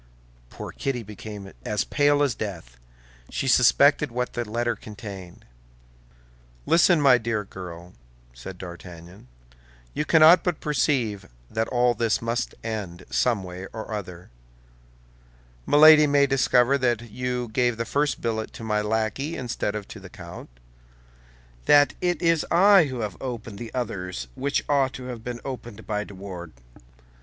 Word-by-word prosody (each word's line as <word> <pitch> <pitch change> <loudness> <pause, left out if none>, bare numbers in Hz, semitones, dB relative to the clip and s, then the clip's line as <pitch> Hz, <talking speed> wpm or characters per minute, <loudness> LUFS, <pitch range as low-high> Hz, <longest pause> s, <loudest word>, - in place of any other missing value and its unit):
Poor - - -8
Kitty 130 -4 -3
became 105 -1 -9
as 105 -2 -1
pale 145 0 +2
as 140 -4 +1
death; 85 - -7 0.5
she - - -3
suspected - - +4
what 125 +1 -3
the 120 -3 -4
letter 120 +1 -1
contained. 100 -4 -10 1.2
"Listen, 170 0 +4
my 135 -4 +5
dear 115 -2 -2
girl," 90 -2 -10 0.4
said 75 +10 -9
D'Artagnan; 85 -2 -11 0.7
"you - - -1
cannot 160 +3 +6
but 175 -4 -1
perceive 120 -8 -1 0.2
that 110 0 -1
all 125 -1 +2
this 115 -1 0
must 115 +1 -3
end, 100 -6 -5
some 115 -6 +1
way 90 +1 -8
or 110 0 -6
other. 90 -6 -7 1.4
Milady 150 +1 +8
may 140 0 +4
discover 135 0 +3
that 120 -3 -1
you 125 0 -3
gave 120 -2 +1
the 115 - -2
first 145 +4 -1
billet 110 -1 -2
to - - -9
my 105 -1 0
lackey 110 +8 -2
instead 120 -4 -3
of 105 -2 -5
to 110 - -9
the 95 -1 -12
count's; 85 -4 -10 1.2
that 145 0 +6
it 175 -1 0
is 165 -2 +3
I 190 0 +6
who 130 -4 -5
have 105 -4 -5
opened 115 -5 -6
the 115 -1 -7
others 90 - -4
which 140 - -1
ought 135 -2 +2
to 130 - -8
have 125 -3 -7
been 120 0 -6
opened 120 -5 -7
by 105 -1 -2
de 100 - -12
Wardes. 90 -4 -8
115 Hz, 150 wpm, -25 LUFS, 100-135 Hz, 1.4 s, Milady